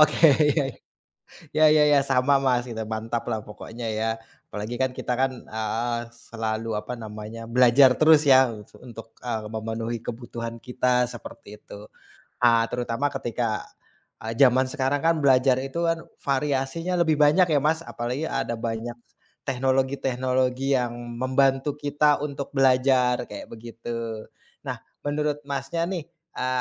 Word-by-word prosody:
Oke, 155 +2 +6 0.3
ya. 145 - +2 0.9
Ya 155 0 +5
ya 150 0 +5
ya, 140 - +6
sama 135 +1 +3
Mas 125 -2 +1
kita 110 -3 -5
mantaplah 110 0 -3
pokoknya 115 +3 -9
ya. 110 +1 -1 0.4
Apalagi 105 +3 -5
kan, 130 - +2
kita 125 - -3
kan 135 0 +2
heeh, 110 +2 -2 0.2
selalu 110 -1 -4
apa 125 - -6
namanya 110 0 -8
belajar 125 +2 +6
terus 155 -1 +6
ya, 130 -2 +6
e 105 -1 -11
su - - -17
untuk, 115 -2 -11
e 125 - -5 0.2
memenuhi 115 +1 -3
kebutuhan 115 0 -6
kita 125 0 +1
seperti 105 -2 -11
itu. 105 +1 -12 0.5
E 120 -1 +5 0.2
terutama 125 +3 -1
ketika, 115 -2 -3 0.6
e - - -7
zaman 130 -1 +5
sekarang 140 0 0
kan, 165 0 +3
belajar 130 -1 +5
itu 135 +6 -2
kan 165 0 -1 0.2
variasinya 140 +5 -1
lebih 160 -2 +3
banyak 150 +5 +5
ya 150 - +4
Mas, 155 +3 +1
apalagi 125 +2 -4
ada 120 - -2
banyak 115 +1 -4 0.5
teknologi-teknologi 130 0 0
yang 120 -1 -2 0.3
membantu 135 +2 +1
kita 145 0 +1
untuk 140 -1 -5
belajar 130 -2 +3
kayak 290 -1 -9
begitu. 115 -1 -6 0.4
Nah, - - -3 0.2
menurut 150 0 -1
Masnya 140 +4 -2
nih, 180 -5 -3 0.3
e 125 - -2
130 Hz, 140 wpm, -25 LUFS, 115-140 Hz, 0.9 s, Oke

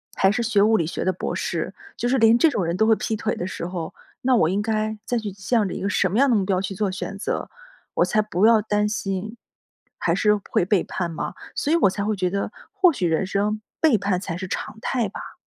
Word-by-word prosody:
还 190 0 +4
是 235 - -1
学 215 -3 +2
物 220 +1 +5
理 165 - 0
学 - - -3
的 185 - +3
博 - - -4
士， - - -2 0.2
就 240 - -1
是 265 - +3
连 225 0 +6
这 325 - +5
种 200 -10 -1
人 170 +2 -1
都 220 - +3
会 220 - +5
劈 220 - -2
腿 215 +1 -2
的 175 - -4
时 170 - -5
候， 175 -3 -5 0.3
那 255 0 +3
我 160 -7 +3
应 200 +3 0
该 215 0 -1
再 245 - 0
去 215 -3 -3
向 205 +1 0
着 - - -5
一 - - -5
个 200 - 0
什 190 - +2
么 205 - -1
样 275 +1 +5
的 235 - +4
目 195 -2 +1
标 190 -1 +1
去 195 0 -4
做 200 -1 0
选 195 +1 -5
择， - - -3 0.5
我 - - +4
才 215 -2 +2
不 210 -1 +1
要 225 -2 +6
担 210 0 +1
心 205 +2 -3 0.6
还 - - +1
是 210 -1 +3
会 175 - +2
背 195 -2 +2
叛 175 -3 -3
嘛， - - -4 0.2
所 295 - -1
以 - - +5
我 200 - +4
才 200 +2 -3
会 215 -1 0
觉 185 -2 0
得， 200 +3 -2 0.2
或 385 -4 +4
许 185 - -2
人 165 +3 +1
生 205 +3 -1 0.2
背 305 -9 +4
叛 195 -2 0
才 175 -3 -5
是 190 0 -5
常 205 - -5
态 240 -6 0
吧。 - - -9
205 Hz, 280 characters per minute, -23 LUFS, 190-220 Hz, 0.6 s, 连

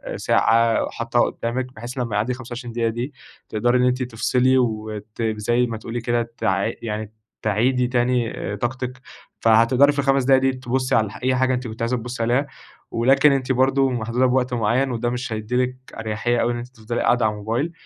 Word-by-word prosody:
ساعة 115 0 +3
حطّاها 115 +1 +1
قدّامِك 125 +2 -4
بحيث 120 +4 -8
لمّا 115 -4 -2
يعدّي 115 +5 0
25 120 -1 -7
دقيقة 115 -1 0
دي 120 +5 -4 0.4
تقدري 120 +3 +2
إن 125 - +2
أنتِ 125 +1 +1
تفصلي 125 +2 +2
وت 110 -2 -3
زي 110 +2 +1
ما 115 -2 -4
تقول 115 +1 -8
لي 120 - -2
كده 120 0 -1
تع 95 +4 0
يعني 110 -1 -4 0.3
تعيدي 120 +4 +1
تاني 120 -1 +1 0.2
طاقتِك، 125 +2 -4 0.4
فهتقدري 115 +5 +5
في 145 - -4
ال5 135 -1 +2
دقايق 130 0 +4
دي 135 0 +3
تبصّي 130 0 -1
على 110 -3 +2
ح - - -9
أي 130 0 +2
حاجة 130 0 +2
أنتِ 125 0 -3
كنتِ 110 0 -8
عايزة 120 +2 0
تبصّي 120 0 -4
عليها 130 +5 +1 0.4
ولكن 135 +5 +4
أنتِ 135 -1 0
برضو 135 +1 +3
محدودة 120 +1 0
بوقت 125 0 +1
معيّن 120 +4 +1
وده 120 0 -1
مش 125 -1 -3
هيدّي 110 +3 -3
لِك 125 0 -3 0.2
أريحية 115 +2 -1
أو 120 - +1
إن 120 - -3
أنتِ 120 - -6
تفضلي 120 -2 -5
قاعدة 120 -2 +3
على 110 - +2
الموبايل 115 +10 -2
120 Hz, 190 wpm, -22 LUFS, 115-130 Hz, 0.4 s, فهتقدري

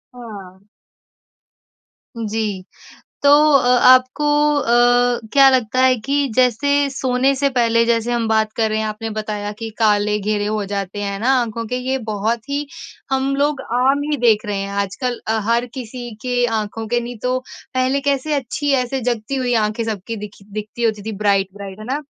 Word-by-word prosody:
हाँ। 200 -5 -11 1.5
जी। 215 -3 -3 0.6
तो 285 - +6 0.3
अ, 250 - 0 0.2
आपको 255 +3 +5 0.3
अ, 245 -2 +3
क्या 275 -1 +7
लगता 255 -2 +1
है 260 0 +5
कि 280 +1 +1
जैसे 280 +3 +2
सोने 265 0 +1
से 280 +1 +1
पहले 230 -3 +2
जैसे 230 0 +1
हम 235 -2 0
बात 220 -1 +1
कर 220 -1 +2
रहे 215 0 -1
हैं, 220 - -1
आपने 215 +1 -4
बताया 210 -1 -4
कि 225 -1 -5
काले 210 -1 +2
घेरे 205 0 -1
हो 210 0 -1
जाते 200 0 -4
हैं 200 -1 -3
ना 235 +5 0
आँखों 230 0 -4
के। 250 - -3
ये 260 +1 -1
बहुत 220 +4 -2
ही 285 +1 -2 0.5
हम 265 +1 0
लोग 285 0 0
आम 265 +3 +2
ही 295 - 0
देख 225 -4 +3
रहे 205 -1 -2
हैं 195 0 -4
आजकल। 240 +5 -3
अ, 220 0 +1
हर 235 +1 +2
किसी 245 -1 -7
के 245 -1 +1
आँखों 225 -1 -3
के 240 +2 +1
नहीं 240 0 -7
तो 250 0 +1 0.4
पहले 255 +2 +1
कैसे 280 +2 0
अच्छी 285 +2 -2
ऐसे 265 +2 -3
जगती 240 +1 -2
हुई 250 -2 0
आँखें 215 +2 -3
सबकी 220 0 -4
दिखी 205 -1 -10
दिखती 215 +3 -5
होती 220 -2 0
थी। 220 - -3
ब्राइट, 200 -2 +2
ब्राइट, 200 -1 -9
है 215 - -8
ना? 270 +5 -2
235 Hz, 180 wpm, -19 LUFS, 215-255 Hz, 1.5 s, क्या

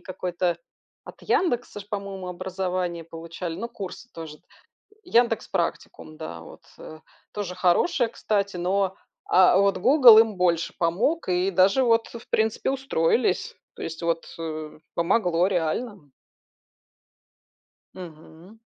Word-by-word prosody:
какое-то 180 -2 -2 0.5
от - - -12
"Яндекса" 245 - 0
ж, 200 - -12
по-моему, 195 -3 -5
образование 180 -1 -3
получали, 165 +1 -7
ну, 230 +3 -4
курсы 225 +1 -8
тоже. 160 -2 -8 0.6
"Яндекс 235 - +1
Практикум", 170 -3 -4
да, 85 - -7
вот, 85 - -14
э, 155 0 -11 0.3
тоже 200 -4 -4
хорошая, 210 - +2
кстати, 200 -4 -2
но, 190 +2 0 0.3
а, 185 0 +5
вот 200 0 +3
"Гугл" 245 0 +8
им 220 -3 +1
больше 170 -2 +1
помог 195 - 0
и 180 +1 +1
даже 195 +7 +4
вот, 230 -1 +3
в 235 0 -11
принципе, 220 +3 0
устроились, 245 -6 0 0.2
то - - -10
есть, 165 0 -6
вот, 170 0 -1
э, 155 -2 -6 0.2
помогло 175 0 +2
реально. 180 - -3 1.8
Мгм. 170 +3 -13
185 Hz, 120 wpm, -25 LUFS, 170-220 Hz, 1.8 s, Гугл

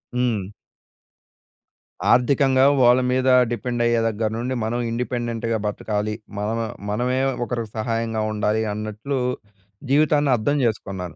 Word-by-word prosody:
హ్మ్. 115 -6 -1 1.6
ఆర్థికంగా 130 +2 +4 0.2
వాళ్ళ 125 +1 +6
మీద 130 0 +1 0.2
డిపెండ్ 120 0 -2
అయ్యే 120 -1 +2
దగ్గర 110 0 -1
నుండి 125 +2 -2
మనం 115 +2 -1
ఇండిపెండెంట్‌గా 115 -1 -2
బతకాలి. 105 0 -2 0.2
మనం 110 +3 -2 0.3
మనమే 125 +5 0 0.3
ఒకరికి 115 -3 -4
సహాయంగా 115 0 -1
ఉండాలి 105 +1 0
అన్నట్లు 110 +6 -4 0.7
జీవితాన్ని 145 0 +3
అర్థం 135 +6 0
చేసుకున్నాను. 95 -5 -3
115 Hz, 110 wpm, -22 LUFS, 110-125 Hz, 1.6 s, వాళ్ళ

